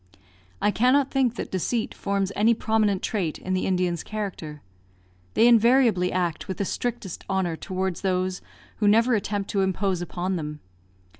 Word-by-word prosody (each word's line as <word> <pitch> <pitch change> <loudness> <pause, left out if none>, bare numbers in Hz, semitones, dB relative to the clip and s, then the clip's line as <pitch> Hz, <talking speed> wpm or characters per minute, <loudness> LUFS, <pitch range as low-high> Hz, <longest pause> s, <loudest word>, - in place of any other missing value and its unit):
I 210 - +4
cannot 255 +5 +3
think 260 -4 +1
that - - -5
deceit 220 +5 -1
forms 200 -1 -1
any 225 +3 +4
prominent 215 -4 +1
trait 180 -8 -1
in 185 - -4
the 185 - 0
Indian's 180 -2 0
character. 185 -8 -6 0.7
They 230 - +6
invariably 235 -5 +4
act 175 -3 -2
with 190 - -4
the 200 - -1
strictest 210 -4 -4
honour 190 -3 0
towards 185 +1 -3
those 185 -1 -1 0.4
who 210 - +1
never 230 +4 +4
attempt 205 -2 -1
to 200 - +1
impose 190 -1 0
upon 180 +1 -2
them. 150 -2 -5
195 Hz, 155 wpm, -25 LUFS, 185-220 Hz, 0.7 s, They